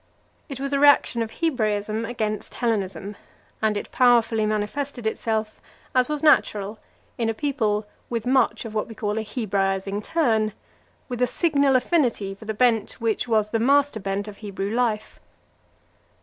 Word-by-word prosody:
It 275 -2 -6
was 275 +1 -3
a 280 - +2
reaction 285 -4 +5
of 225 - -2
Hebraism 220 -7 -1
against 215 -3 -3
Hellenism; 205 -3 -2 0.5
and 215 -1 +1
it - - -6
powerfully 230 -3 +3
manifested 225 +4 -3
itself, 220 0 -2 0.3
as 255 +1 +3
was 300 0 -3
natural, 210 -8 +3 0.4
in 230 -1 +1
a 225 - -1
people 220 -6 0 0.2
with 230 -2 -3
much 245 -3 +2
of 220 - -7
what 215 - -1
we 225 - -10
call 210 -2 -2
a - - -3
Hebraising 200 -2 -1
turn, 220 -8 +1 0.5
with 245 -1 -5
a 250 - +4
signal 280 -2 +2
affinity 245 - +1
for 200 +3 -13
the 220 0 -3
bent 235 -1 +2
which 230 +1 -1
was 215 -2 +1
the 225 - +1
master 280 0 +3
bent 195 +1 -3
of 205 -1 -9
Hebrew 200 -1 -4
life. 230 -3 -1
225 Hz, 160 wpm, -24 LUFS, 210-250 Hz, 0.5 s, reaction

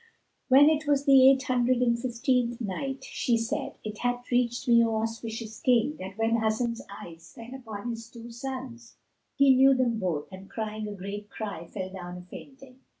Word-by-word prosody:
When 275 +2 +7
it 310 -1 +2
was 285 -1 +2
the 270 -2 +8
Eight 270 0 +3
Hundred 250 -1 +2
and 240 -1 +2
Fifteenth 240 0 0
Night, 265 +6 -4
She 235 -2 0
said, 270 +6 -3
It 215 -1 -6
hath 245 0 -2
reached 245 +1 0
me, 235 -1 +6
O 225 -1 0
auspicious 225 0 -5
King, 250 +4 +2
that 190 +2 -8
when 225 +1 +2
Hasan's 230 +1 -1
eyes 170 -4 -11
fell 230 +2 -10
upon 230 -3 -6
his 230 0 -8
two 235 -1 -11
sons, 250 -1 -7 0.4
he 275 -2 +5
knew 270 +1 +6
them 240 -3 +1
both 170 -7 -2
and 190 +1 -11
crying 215 -1 -4
a 205 - -6
great 200 +2 -7
cry 195 -6 -6
fell 185 0 -6
down 180 -2 -8
a - - -9
fainting. 265 +7 -13
235 Hz, 185 wpm, -27 LUFS, 215-255 Hz, 0.4 s, the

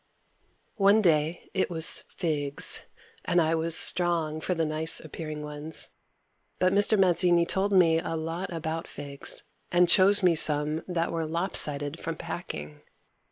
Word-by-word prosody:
One 205 +1 +4
day 160 -1 0
it 190 - 0
was 165 -2 -1
figs, 145 -4 0 0.4
and 175 - +1
I 160 -1 +1
was 165 0 +1
strong 165 -3 +1
for 180 - -2
the 165 -1 0
nice 155 +1 +2
appearing 155 -1 -7
ones, 150 +1 -3 0.7
but 185 +1 +1
Mr. 205 +2 +4
Mazzini 175 -2 +3
told 195 +3 -1
me 170 -4 +4
a 165 0 -4
lot 165 +4 -4
about 165 0 -4
figs 140 -1 -2 0.3
and 175 0 +4
chose 195 +3 +4
me 180 -2 +5
some 150 0 +1
that 170 -2 -2
were 165 -1 -2
lop 170 +4 -3
sided 145 +2 -2
from 165 0 -5
packing. 75 - -7
165 Hz, 150 wpm, -27 LUFS, 155-180 Hz, 0.7 s, me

